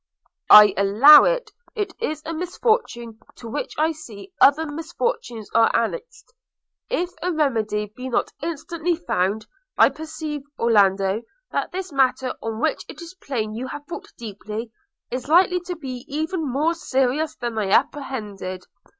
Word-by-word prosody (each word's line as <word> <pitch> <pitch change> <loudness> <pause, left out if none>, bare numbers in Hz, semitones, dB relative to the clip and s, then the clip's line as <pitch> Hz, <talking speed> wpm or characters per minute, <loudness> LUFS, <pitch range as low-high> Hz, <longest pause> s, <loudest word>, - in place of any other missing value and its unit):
'I 210 -2 +10
allow 220 +10 +8
it. - - 0 0.2
It 415 -3 -3
is 310 -9 -3
a 330 - -4
misfortune 330 - -1 0.2
to 235 - -10
which 365 - -5
I 315 +2 +2
see 310 - -11
other 295 +3 +6
misfortunes 315 - -4
are 225 0 +5
annexed, 450 - -3 0.6
if 360 -7 -1
a 360 - -1
remedy 220 - -1
be 255 +1 -6
not 240 - 0
instantly 335 +2 -2
found. 215 - -1 0.3
I - - +7
perceive, 310 -1 -6 0.2
Orlando, 200 -2 +2 0.3
that - - -2
this 375 -1 -5
matter, 265 -1 +1
on 225 -1 -4
which - - 0
it - - -10
is 340 0 -10
plain 220 -6 -3
you 245 +4 -5
have 290 +3 -8
thought 385 +6 -8
deeply, 215 +1 -7 0.4
is 255 +1 -4
likely 360 +2 +4
to 360 - -3
be 260 -6 -7
even 315 0 -3
more 305 +6 +1
serious 280 -1 -1
than 240 -1 -4
I 200 -2 -1
apprehended. 205 -8 -1
275 Hz, 150 wpm, -22 LUFS, 225-330 Hz, 0.6 s, I